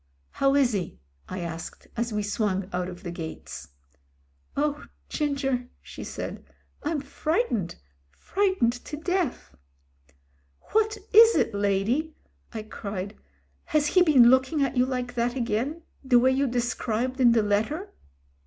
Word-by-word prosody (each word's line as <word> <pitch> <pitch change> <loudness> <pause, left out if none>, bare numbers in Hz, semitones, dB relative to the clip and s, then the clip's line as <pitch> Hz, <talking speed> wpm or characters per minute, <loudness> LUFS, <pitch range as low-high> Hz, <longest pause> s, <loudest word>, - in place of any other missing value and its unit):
"How 275 0 +2
is 265 -4 +4
he 185 -5 -3 0.2
?" 70 - -28
I 185 0 -4
asked, 165 -1 -6
as 235 0 -1
we 210 -1 -1
swung 200 -3 -1
out 180 0 -1
of 180 +1 -10
the 175 - -4
gates. 165 -2 -7 0.9
"Oh! 295 +1 0 0.2
Ginger," 270 -4 -1
she - - -9
said. - - -6 0.4
"I'm 300 -1 -1
frightened 280 - -1 0.3
— 70 - -40
fright 380 - -1
ened 240 +1 +1
to 300 - -5
death." 355 -2 -2 1.2
"What 435 0 +2 0.2
is 450 +2 +9
it, 230 - +2
lady," 205 +10 0 0.4
I 220 -2 -5
cried. 200 -2 -6 0.5
"Has 305 -1 +2
he 365 +5 +4
been 265 -8 +7
looking 260 +3 +3
at 275 - -1
you 250 0 +3
like 250 -1 -3
that 240 +1 0
again, 255 +7 -1 0.2
the 260 -2 +5
way 255 +2 +5
you 270 +1 +2
described 245 +1 -1
in 240 -2 +7
the 225 -2 +3
letter?" 220 - -1
245 Hz, 150 wpm, -26 LUFS, 210-295 Hz, 1.2 s, is